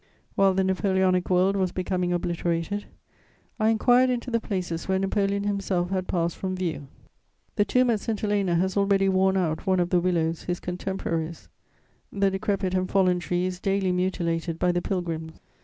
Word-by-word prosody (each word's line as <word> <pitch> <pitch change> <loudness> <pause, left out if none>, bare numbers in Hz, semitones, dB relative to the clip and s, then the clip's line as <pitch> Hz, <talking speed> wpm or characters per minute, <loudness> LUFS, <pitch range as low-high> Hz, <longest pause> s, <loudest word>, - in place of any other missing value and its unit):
* - - -37
While 195 -1 +4
the 190 - +2
Napoleonic 190 -1 +1
world 185 +2 +3
was 190 -2 0
becoming 180 -1 -1
obliterated, 175 +3 -2 0.7
I 215 0 +3
inquired 245 +3 +4
into 245 0 -2
the 230 - +2
places 180 -6 -4
where 190 0 +2
Napoleon 195 +1 0
himself 195 -3 -1
had 185 -1 -1
passed 170 -1 -1
from 185 -1 -3
view. 160 -6 -3 0.7
The 205 - +3
tomb 250 +2 +3
at 220 - +1
St. 220 0 -3
Helena 200 -4 +1
has 185 +2 0
already 200 -1 +3
worn 190 0 +3
out 170 0 -1
one 185 -1 +3
of 175 0 0
the 180 - +4
willows 170 -2 0
his 180 0 -2
contemporaries: 175 -3 -4 0.6
the 195 -1 +1
decrepit 195 -1 -1
and 185 0 0
fallen 185 -2 +3
tree 175 +1 -1
is 185 -1 -3
daily 195 -1 0
mutilated 170 -2 -1
by 180 - +2
the 175 0 -1
pilgrims. 165 -4 -3
185 Hz, 175 wpm, -26 LUFS, 175-195 Hz, 0.7 s, While